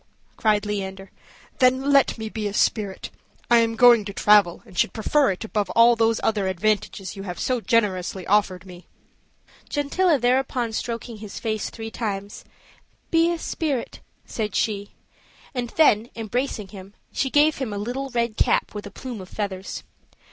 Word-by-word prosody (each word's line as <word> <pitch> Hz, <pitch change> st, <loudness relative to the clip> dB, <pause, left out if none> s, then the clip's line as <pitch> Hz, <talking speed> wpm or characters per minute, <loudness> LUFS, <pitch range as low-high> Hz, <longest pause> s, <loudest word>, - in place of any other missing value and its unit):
cried 210 Hz, -2 st, +1 dB
Leander, 195 Hz, -2 st, -5 dB, 0.5 s
"then 260 Hz, +2 st, +3 dB
let 275 Hz, -3 st, +4 dB
me 220 Hz, -1 st, -5 dB
be 215 Hz, -1 st, -3 dB
a 205 Hz, -, -5 dB
spirit; 205 Hz, -4 st, 0 dB, 0.4 s
I 235 Hz, -, +7 dB
am 225 Hz, 0 st, +1 dB
going 240 Hz, -2 st, +7 dB
to 200 Hz, -, -6 dB
travel, 205 Hz, -4 st, +4 dB
and 185 Hz, -, -16 dB
should -, -, +1 dB
prefer 275 Hz, +6 st, +2 dB
it 185 Hz, -, -3 dB
above 210 Hz, -3 st, -2 dB
all 235 Hz, +1 st, +7 dB
those 225 Hz, -1 st, +2 dB
other 210 Hz, -3 st, +1 dB
advantages 195 Hz, 0 st, -1 dB
you 195 Hz, -, -7 dB
have 180 Hz, -3 st, -6 dB
so 250 Hz, -2 st, 0 dB
generously 190 Hz, -5 st, 0 dB
offered 190 Hz, -3 st, +1 dB
me." 180 Hz, -1 st, -13 dB, 0.8 s
Gentilla 305 Hz, +3 st, +2 dB
thereupon 250 Hz, -2 st, 0 dB
stroking 230 Hz, 0 st, -4 dB
his 210 Hz, -1 st, -8 dB
face 220 Hz, -3 st, -2 dB
three 225 Hz, -1 st, -8 dB
times, 205 Hz, -3 st, -4 dB, 0.7 s
"Be 330 Hz, +1 st, +4 dB
a 340 Hz, -, -1 dB
spirit," 295 Hz, -6 st, -3 dB, 0.3 s
said 215 Hz, -2 st, -4 dB
she; 205 Hz, -2 st, -1 dB, 0.6 s
and 245 Hz, -2 st, -3 dB
then, 235 Hz, -7 st, +4 dB
embracing 225 Hz, -2 st, -3 dB
him, 195 Hz, +1 st, -12 dB, 0.2 s
she 270 Hz, -, -1 dB
gave 295 Hz, +3 st, +4 dB
him 260 Hz, -5 st, -3 dB
a 205 Hz, -, -4 dB
little 250 Hz, +6 st, -4 dB
red 235 Hz, -3 st, -1 dB
cap -, -, +1 dB
with 210 Hz, -1 st, -6 dB
a -, -, -8 dB
plume 240 Hz, 0 st, -7 dB
of 185 Hz, -, -11 dB
feathers. 195 Hz, -3 st, -5 dB
220 Hz, 165 wpm, -23 LUFS, 200-245 Hz, 0.8 s, I